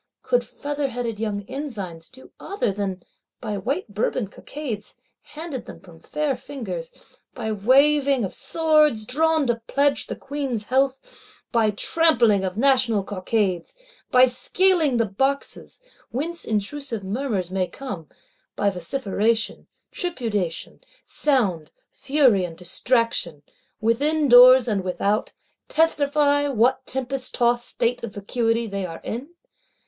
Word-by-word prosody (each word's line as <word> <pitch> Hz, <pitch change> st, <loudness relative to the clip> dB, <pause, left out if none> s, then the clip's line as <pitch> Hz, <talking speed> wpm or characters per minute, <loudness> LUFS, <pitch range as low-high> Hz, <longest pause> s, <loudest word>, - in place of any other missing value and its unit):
Could -, -, +2 dB
featherheaded 255 Hz, -6 st, -4 dB
young 205 Hz, -2 st, -3 dB
ensigns 205 Hz, -, -6 dB
do 260 Hz, 0 st, -16 dB
other 400 Hz, -, -2 dB
than, 190 Hz, -2 st, -4 dB, 0.4 s
by 215 Hz, -3 st, -4 dB
white 240 Hz, -, -3 dB
Bourbon 210 Hz, +1 st, -1 dB
Cockades, 240 Hz, -4 st, -7 dB, 0.3 s
handed 305 Hz, -5 st, -7 dB
them -, -, -10 dB
from 170 Hz, -3 st, -16 dB
fair 300 Hz, -, -2 dB
fingers; -, -, -8 dB, 0.2 s
by 220 Hz, -3 st, -3 dB
waving 270 Hz, +4 st, +3 dB
of 190 Hz, -, -3 dB
swords, 305 Hz, -8 st, +3 dB
drawn 315 Hz, +4 st, +2 dB
to 235 Hz, -2 st, -1 dB
pledge 280 Hz, 0 st, +1 dB
the -, -, -4 dB
Queen's 270 Hz, -6 st, -4 dB
health; 265 Hz, +3 st, -2 dB
by 230 Hz, -3 st, +3 dB
trampling 230 Hz, -, +3 dB
of 190 Hz, +1 st, -3 dB
National 250 Hz, -5 st, +3 dB
Cockades; 190 Hz, -, -2 dB, 0.3 s
by 255 Hz, 0 st, +7 dB
scaling 310 Hz, +2 st, +2 dB
the 230 Hz, -, +2 dB
Boxes, 270 Hz, +8 st, -2 dB, 0.3 s
whence 330 Hz, +7 st, -4 dB
intrusive 225 Hz, +2 st, -3 dB
murmurs 200 Hz, -3 st, -2 dB
may 185 Hz, -1 st, 0 dB
come; 200 Hz, -, -8 dB, 0.5 s
by 200 Hz, -1 st, +1 dB
vociferation, 215 Hz, +3 st, -1 dB, 0.2 s
tripudiation, 225 Hz, -, -2 dB, 0.3 s
sound, 200 Hz, -, 0 dB, 0.2 s
fury 265 Hz, -9 st, +3 dB
and 165 Hz, -2 st, -6 dB
distraction, 180 Hz, -, 0 dB, 0.4 s
within 285 Hz, +8 st, +1 dB
doors 250 Hz, 0 st, +8 dB
and 205 Hz, -4 st, 0 dB
without,—testify 285 Hz, -, 0 dB
what 260 Hz, +1 st, +1 dB
tempest 265 Hz, 0 st, -3 dB
tost 240 Hz, 0 st, +1 dB
state 245 Hz, +1 st, -1 dB
of 220 Hz, -4 st, -6 dB
vacuity 230 Hz, +3 st, 0 dB
they 200 Hz, -2 st, -4 dB
are 165 Hz, -3 st, -6 dB
in? 280 Hz, +10 st, -6 dB
240 Hz, 120 wpm, -23 LUFS, 205-280 Hz, 0.5 s, doors